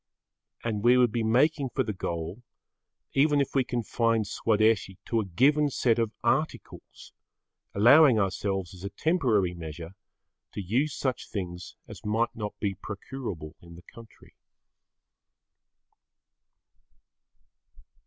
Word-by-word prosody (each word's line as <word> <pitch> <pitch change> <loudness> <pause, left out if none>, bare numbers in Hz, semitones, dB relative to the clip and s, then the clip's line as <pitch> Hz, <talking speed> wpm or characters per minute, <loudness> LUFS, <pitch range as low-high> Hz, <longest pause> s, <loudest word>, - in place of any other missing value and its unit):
And 110 -3 -2
we 120 +1 +6
would 125 -3 +4
be 115 - -1
making 135 +5 +2
for 130 - +2
the 110 - -3
goal 85 +3 -5 0.7
even 145 +1 +3
if 140 - -1
we 135 - +3
confined 115 -2 0
Swadeshi 110 -2 +1
to 115 - 0
a 110 - -1
given 145 - +3
set 120 -3 +1
of 115 -2 0
articles - - -3 0.6
allowing 125 +5 +7
ourselves 95 -2 -1
as 90 0 -12
a 100 - -4
temporary 115 - +1
measure 80 0 -8 0.6
to - - -5
use 130 - 0
such 130 -2 -3
things 90 -4 -6
as - - -11
might 110 +3 0
not 105 -2 -5
be 100 -2 -1
procurable 100 - -7
in 85 -1 -13
the 85 - -14
country. 115 -1 -16
110 Hz, 125 wpm, -27 LUFS, 95-125 Hz, 0.7 s, allowing